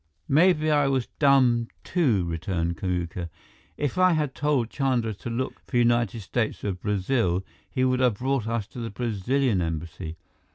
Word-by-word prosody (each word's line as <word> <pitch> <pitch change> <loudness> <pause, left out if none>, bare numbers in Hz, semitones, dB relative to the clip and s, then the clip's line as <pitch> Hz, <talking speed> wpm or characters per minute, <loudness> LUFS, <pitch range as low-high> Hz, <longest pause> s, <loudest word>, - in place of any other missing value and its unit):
"Maybe 155 0 +4
I 145 -2 +3
was 135 -3 +1
dumb, 130 -5 +4 0.2
too," 125 - +1
returned 85 +1 -2
Kamuka. 90 -3 -3 0.5
"If 145 +4 -2
I 185 -1 +5
had 150 -4 0
told 145 -6 0
Chandra 125 -5 0
to 105 - -7
look 120 +3 -3
for 125 - -1
United 120 -2 +2
States 110 +3 -2
of 95 -3 -3
Brazil, 100 -2 0 0.2
he 130 -1 0
would 130 0 +2
have 125 -4 +3
brought 130 -2 -1
us 115 -2 -1
to - - -9
the 115 -1 -3
Brazilian 115 +1 0
Embassy. 80 0 -4
120 Hz, 160 wpm, -26 LUFS, 95-135 Hz, 0.5 s, I